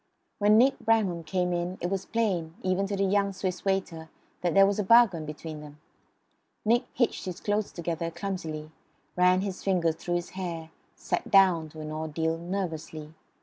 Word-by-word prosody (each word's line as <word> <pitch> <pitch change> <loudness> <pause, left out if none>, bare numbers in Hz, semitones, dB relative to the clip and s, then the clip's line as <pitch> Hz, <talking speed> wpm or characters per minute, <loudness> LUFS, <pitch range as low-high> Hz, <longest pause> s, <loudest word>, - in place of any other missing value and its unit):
When 210 +1 +5
Nick 260 +5 +4
Bramham 220 -7 +1
came 180 +2 -1
in 175 +2 -2
it 175 - -3
was 195 0 -2
plain, 180 -8 -1
even 190 +1 +1
to 200 - -2
the 195 - 0
young 200 0 +2
Swiss 185 -1 -3
waiter, 185 -5 -2 0.3
that 175 0 0
there 195 0 +8
was 200 +1 0
a - - +2
bargain 195 -7 +5
between 155 +1 -7
them. 150 0 -12 0.9
Nick 235 +3 +3
hitched 240 -4 0
his 180 -2 -5
clothes 205 0 -1
together 170 -1 -3
clumsily; 160 -5 -5 0.4
ran 180 +1 +4
his 195 -2 -4
fingers 175 -4 +2
through 175 +2 -3
his 175 0 -2
hair; 170 -4 -5 0.2
sat - - -3
down, 185 -5 +5
to 155 +1 -10
an 155 0 -6
ordeal, 160 +1 -2
nervously. 165 -4 -5
180 Hz, 175 wpm, -28 LUFS, 165-195 Hz, 0.9 s, there